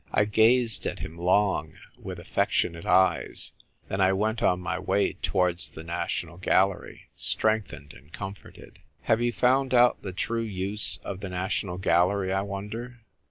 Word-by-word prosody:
" - - -29
I - - +3
gazed 115 +2 +3
at - - -5
him 80 - -6
long, 90 -1 +1 0.2
with - - -8
affectionate 85 -1 -1
eyes; 95 0 +2 0.3
then 95 - -2
I 95 0 +4
went 110 +3 -1
on 90 - +2
my 95 +1 -3
way 95 +2 +1
towards 90 -2 0
the 80 - -10
National 85 0 -4
Galler}', 95 +1 +1
strengthened 110 -9 -1
and 70 +4 -17
comforted. 95 +2 -10 0.2
Have 115 +1 +1
you 120 0 +1
found 130 +2 +2
out 120 0 +5
the 95 - -5
true 115 +5 -2
use 100 -2 -1
of 95 -2 -5
the 100 -1 -6
National 90 0 -2
Gallery, 95 +2 +2
I 95 - +1
wonder 105 +5 -6
95 Hz, 160 wpm, -27 LUFS, 90-110 Hz, 0.3 s, out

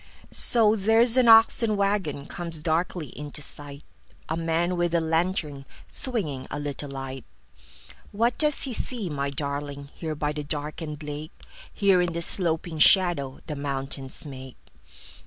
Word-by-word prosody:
So, 220 -3 +4
there's 225 +3 +3
an 255 -2 +4
oxen 225 -1 +6
wagonComes 170 -4 -2
darkly 165 -2 -1
into 145 +2 -6
sight:A 145 +2 -7
man 165 +2 0
with 175 -1 0
a - - +4
lantern, 160 -3 -1 0.2
swingingA 150 - -1
little 145 0 -4
light. 135 -2 -6 0.9
What 235 +4 +1
does 300 -2 +4
he 265 - -1
see, 225 -7 +1
my 140 -1 -2
darlingHere 140 +2 -5
by 150 0 -1
the 150 0 -5
darkened 150 +1 -5
lake? 150 +1 -8 0.3
Here, 195 -3 +3
in 175 -1 -1
the 170 0 +1
sloping 165 -2 0
shadowThe 150 -5 +3
mountains 135 0 -3
make? 130 -2 -9
160 Hz, 125 wpm, -25 LUFS, 145-185 Hz, 0.9 s, oxen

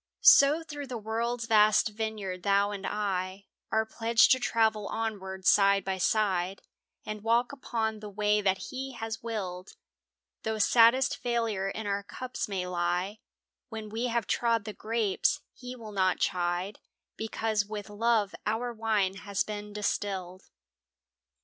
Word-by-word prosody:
So 290 +4 +7
through 290 -3 -7
the 245 -2 -4
world's 230 +2 -2
vast 215 -1 +4
vineyard 210 -4 -4
thou 200 +1 +2
and 200 -1 -5
I 195 -2 -2 0.3
Are 220 0 +2
pledged 225 +1 +3
to 260 - +5
travel 220 -4 +1
onward 190 -4 -4
side 200 -1 +5
by 190 -1 -2
side 190 -2 +1 0.4
And 215 -1 -6
walk 235 +2 +2
upon 225 -5 -3
the 210 0 -8
way 210 +1 +1
that 190 -1 -1
He 265 +1 -5
has 225 -1 -5
willed. 195 -5 -5 0.7
Though 220 0 -2
saddest 235 +4 +5
failure 230 -5 -1
in 220 +2 -5
our 200 0 -1
cups 255 +5 -5
may 190 -3 -2
lie 180 +3 -1 0.5
When 220 -2 -6
we 230 +3 -2
have 235 -3 0
trod 230 +1 +1
the 215 - -5
grapes, 225 +6 0
He 250 0 -8
will 225 -3 -9
not 185 -2 +2
chide, 180 +2 -1 0.4
Because 220 -1 -1
with 210 -1 -6
love 215 -1 +1
our 235 +3 -1
wine 215 -4 0
has 200 0 -1
been 210 -1 -6
distilled. 195 -3 -3
215 Hz, 145 wpm, -29 LUFS, 195-230 Hz, 0.7 s, So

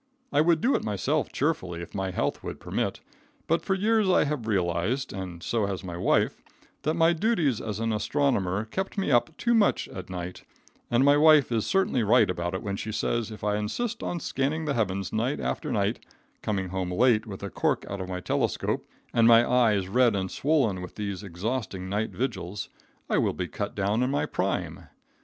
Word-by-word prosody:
I 145 - +5
would 165 0 +3
do 270 - +3
it - - 0
myself 120 +9 -1
cheerfully 95 - -1
if - - -11
my 95 -1 -2
health 90 - -2
would - - -6
permit, - - -2 0.4
but 165 +1 +1
for 190 - +1
years 215 +1 +2
I 185 - +5
have 145 -6 -3
realized, 100 +6 0
and 90 -3 -6
so 110 -4 0
has 95 -1 -4
my 85 -2 -6
wife, 85 - +1 0.4
that 155 +1 0
my 165 0 +4
duties 165 - +1
as 105 -1 -4
an 115 0 0
astronomer 105 -5 0
kept 190 - -4
me 195 -7 0
up 135 +6 +2
too 235 - +1
much 220 -3 +3
at 95 -1 -8
night, 90 0 -6 0.5
and 120 +3 +3
my 145 +1 +6
wife 150 -3 +6
is 115 -2 0
certainly 190 -10 +2
right 110 -2 +4
about 85 0 -3
it 95 - -4
when 100 -1 -3
she 110 - -4
says 115 +1 -1
if 110 -2 -10
I 105 0 +1
insist 115 - -3
on 175 - -2
scanning 155 +2 -1
the 145 - 0
heavens 100 -5 -1
night 110 - 0
after 65 -1 -2
night, - - 0 0.4
coming 95 -4 -2
home 95 -1 -3
late 110 +3 +3
with 95 -3 -7
the 100 - -5
cork - - 0
out 100 -1 -4
of 95 - -5
my 90 -1 -4
telescope - - -1 0.3
and 115 -1 +5
my 115 0 +7
eyes 110 -6 +3
red 120 +1 +3
and 95 -1 -2
swollen 130 -11 +1
with 90 - -8
these 100 -3 -4
exhausting 95 0 -4
night 105 +3 -1
vigils, 105 -6 -4 0.4
I - - +2
will - - +1
be 90 - -3
cut 100 +6 -4
down 105 +3 +1
in 125 - +1
my 140 - 0
prime. - - -2
110 Hz, 200 wpm, -27 LUFS, 95-140 Hz, 0.5 s, my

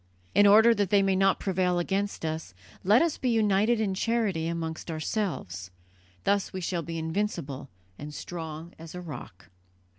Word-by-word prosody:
In 205 +1 +6
order 220 +3 +7
that 205 -4 0
they 200 -1 +4
may 195 -1 +2
not 195 0 +3
prevail 180 -2 +1
against 195 +1 -1
us, 160 - -4 0.3
let 210 - +5
us 335 -3 -1
be 255 - 0
united 215 0 +3
in 205 -3 0
charity 200 -5 0
amongst 165 0 -4
ourselves; 155 - -3 0.5
thus 200 -1 +1
we 190 - -4
shall 175 -1 -2
be 165 +1 -5
invincible 160 -5 -3 0.3
and 145 +1 -6
strong 160 +1 -7
as 165 +1 -9
a 180 - -5
rock." 130 - -9
185 Hz, 160 wpm, -28 LUFS, 160-205 Hz, 0.5 s, order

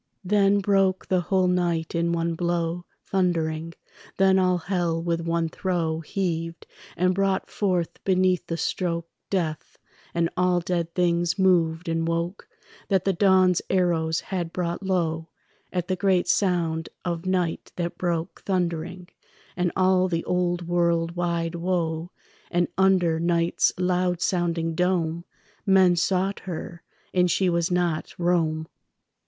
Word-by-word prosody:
Then 200 +1 +3
broke 195 -1 +1
the 185 -1 +2
whole 185 +1 +1
night 175 -3 0
in 170 0 +1
one 170 0 0
blow, 170 0 -2 0.2
Thundering; 165 -3 -1 0.4
then 190 0 +4
all 180 -1 +3
hell 175 -2 -1
with 170 0 -1
one 165 0 0
throe 165 -2 -1
Heaved, 165 -1 -3 0.3
and 180 +1 +2
brought 195 0 0
forth 180 -5 -1
beneath 185 -2 +2
the 165 - -2
stroke 170 0 -2 0.2
Death; 165 -6 -2 0.4
and 170 0 +2
all 180 0 +2
dead 170 -1 -2
things 175 0 +1
moved 175 -3 +2
and 165 0 0
woke 170 +3 -3 0.4
That 190 -3 +1
the 195 - +2
dawn's 185 -1 +4
arrows 165 -3 +1
had 175 -4 -4
brought 175 0 -2
low, 165 -4 -1 0.4
At 180 -1 -2
the 185 - 0
great 185 -1 +2
sound 170 -4 +1 0.2
of 170 0 -3
night 180 -3 -1
that 170 -1 -4
broke 170 -2 -2
Thundering, 180 -1 -2 0.5
and 180 -1 0
all 185 0 +3
the 170 -2 -2
old 175 -1 0
world 170 -1 +1
wide 170 -1 -1
woe; 170 -1 -1 0.4
And 175 -1 +1
under 185 -4 +3
night's 170 0 +2
loud 180 -1 +1
sounding 170 -2 0
dome 170 -1 0 0.4
Men 190 -3 +5
sought 190 +3 0
her, 170 -1 -7 0.3
and 180 -1 +3
she 185 +1 +2
was 170 +1 +1
not 175 -3 -1
Rome. 165 -3 +1
175 Hz, 135 wpm, -25 LUFS, 165-185 Hz, 0.5 s, Men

